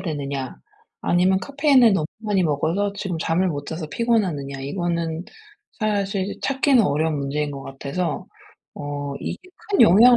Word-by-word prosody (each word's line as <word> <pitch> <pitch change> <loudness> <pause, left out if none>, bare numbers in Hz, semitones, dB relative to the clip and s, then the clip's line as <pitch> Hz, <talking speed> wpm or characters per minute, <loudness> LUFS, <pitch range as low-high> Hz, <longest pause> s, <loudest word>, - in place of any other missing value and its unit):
되느냐 140 -6 -3 0.5
아니면 185 +2 +3
카페인을 275 -5 +4
너무 160 -5 +1
많이 205 -4 +1
먹어서 165 +7 0
지금 180 -5 -3
잠을 175 +4 +1
못 145 -3 -4
자서 160 0 -4
피곤하느냐 175 - 0
이거는 170 +2 -2 0.5
사실 200 -2 -1
찾기는 270 -3 +4
어려운 155 -1 +1
문제인 145 +2 -1
것 140 -1 -7
같아서. 140 +4 -3 0.5
어 145 -1 -4
이게 - - -3 0.3
큰 395 - +3
영향을 230 +8 +8
170 Hz, 320 characters per minute, -23 LUFS, 145-205 Hz, 0.5 s, 영향을